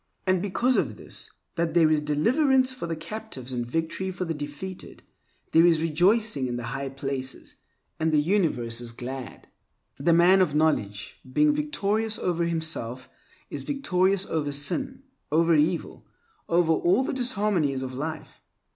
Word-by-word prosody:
And 185 Hz, -1 st, +2 dB
because 240 Hz, +7 st, +1 dB
of -, -, -1 dB
this—that 170 Hz, -2 st, -6 dB
there 160 Hz, -2 st, +5 dB
is 155 Hz, -1 st, +3 dB
deliverance 255 Hz, -, +2 dB
for 255 Hz, -9 st, -6 dB
the 165 Hz, -, -2 dB
captives 165 Hz, -, -8 dB
and 120 Hz, -1 st, -1 dB
victory 165 Hz, +8 st, -2 dB
for 185 Hz, 0 st, -4 dB
the 165 Hz, -, -2 dB
defeated—there 160 Hz, +2 st, -3 dB
is 165 Hz, -2 st, +4 dB
rejoicing 175 Hz, -, +2 dB
in 120 Hz, -1 st, -3 dB
the 120 Hz, -, -5 dB
High 135 Hz, 0 st, -3 dB
Places, 135 Hz, -1 st, -5 dB, 0.4 s
and 160 Hz, 0 st, +1 dB
the 155 Hz, -, +3 dB
universe 145 Hz, -, 0 dB
is 120 Hz, -1 st, -8 dB
glad. 125 Hz, +1 st, -7 dB, 0.5 s
The 155 Hz, +5 st, +2 dB
man 175 Hz, +3 st, +6 dB
of 150 Hz, -6 st, +1 dB
knowledge, 110 Hz, -10 st, 0 dB
being 300 Hz, -, +4 dB
victorious 225 Hz, -7 st, -1 dB
over 170 Hz, -3 st, 0 dB
himself, 160 Hz, -7 st, -2 dB, 0.4 s
is -, -, -4 dB
victorious 195 Hz, -8 st, +1 dB
over 150 Hz, -3 st, -2 dB
sin, 260 Hz, -, -2 dB, 0.3 s
over 165 Hz, +2 st, +4 dB
evil, 160 Hz, +3 st, 0 dB, 0.4 s
over 170 Hz, -1 st, +3 dB
all 180 Hz, +11 st, +2 dB
the -, -, -2 dB
disharmonies 205 Hz, -, +1 dB
of 130 Hz, 0 st, -5 dB
life. 155 Hz, +4 st, -6 dB
165 Hz, 145 wpm, -26 LUFS, 145-195 Hz, 0.5 s, man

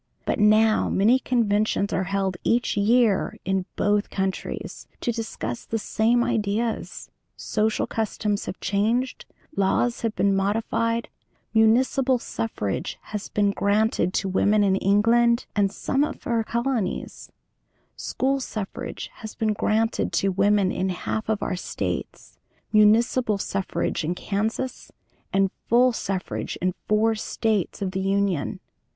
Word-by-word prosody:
But -, -, -1 dB
now 215 Hz, +1 st, +4 dB
many 225 Hz, +7 st, +4 dB
conventions 215 Hz, -5 st, +1 dB
are 190 Hz, -, 0 dB
held 195 Hz, -1 st, -1 dB
each 240 Hz, +1 st, +1 dB
year 215 Hz, 0 st, +2 dB
in 190 Hz, 0 st, 0 dB
both 205 Hz, 0 st, +1 dB
countries 190 Hz, -1 st, -4 dB
to 240 Hz, -, -1 dB
discuss 220 Hz, -, -4 dB
the 225 Hz, -, -2 dB
same 230 Hz, +2 st, +2 dB
ideas; 225 Hz, -1 st, -2 dB, 0.3 s
social 215 Hz, 0 st, 0 dB
customs 210 Hz, -2 st, -2 dB
have -, -, -5 dB
changed; 225 Hz, +7 st, 0 dB, 0.3 s
laws 215 Hz, +5 st, +1 dB
have 225 Hz, -2 st, -1 dB
been 200 Hz, -1 st, +2 dB
modified; 225 Hz, +3 st, 0 dB, 0.5 s
municipal 250 Hz, +4 st, +3 dB
suffrage 220 Hz, -, -3 dB, 0.2 s
has 210 Hz, -1 st, -4 dB
been 205 Hz, -1 st, +2 dB
granted 205 Hz, -1 st, +1 dB
to 195 Hz, -, 0 dB
women 205 Hz, +2 st, +3 dB
in 195 Hz, -1 st, +3 dB
England 235 Hz, +5 st, +3 dB
and 200 Hz, -2 st, +2 dB
some 270 Hz, +6 st, 0 dB
of 300 Hz, -, -4 dB
her 230 Hz, -1 st, 0 dB
colonies; 235 Hz, -3 st, -2 dB, 0.6 s
school 270 Hz, +1 st, -1 dB
suffrage 215 Hz, -6 st, -5 dB
has 220 Hz, -2 st, -8 dB
been 220 Hz, -2 st, 0 dB
granted 220 Hz, +2 st, 0 dB
to 195 Hz, -, +2 dB
women 200 Hz, 0 st, +2 dB
in 190 Hz, +1 st, -1 dB
half 215 Hz, +4 st, -3 dB
of 215 Hz, -2 st, 0 dB
our -, -, -1 dB
States, 180 Hz, -, -5 dB, 0.3 s
municipal 215 Hz, +1 st, +4 dB
suffrage 195 Hz, -3 st, -2 dB
in 170 Hz, +3 st, -1 dB
Kansas, 220 Hz, +7 st, -3 dB, 0.4 s
and 195 Hz, -1 st, +2 dB, 0.2 s
full 245 Hz, +2 st, +5 dB
suffrage 195 Hz, -4 st, -3 dB
in 185 Hz, +1 st, 0 dB
four 215 Hz, +1 st, +3 dB
States 215 Hz, -2 st, -1 dB
of 190 Hz, -, -2 dB
the 190 Hz, -, -3 dB
Union. 195 Hz, -4 st, 0 dB
215 Hz, 130 wpm, -24 LUFS, 195-230 Hz, 0.6 s, full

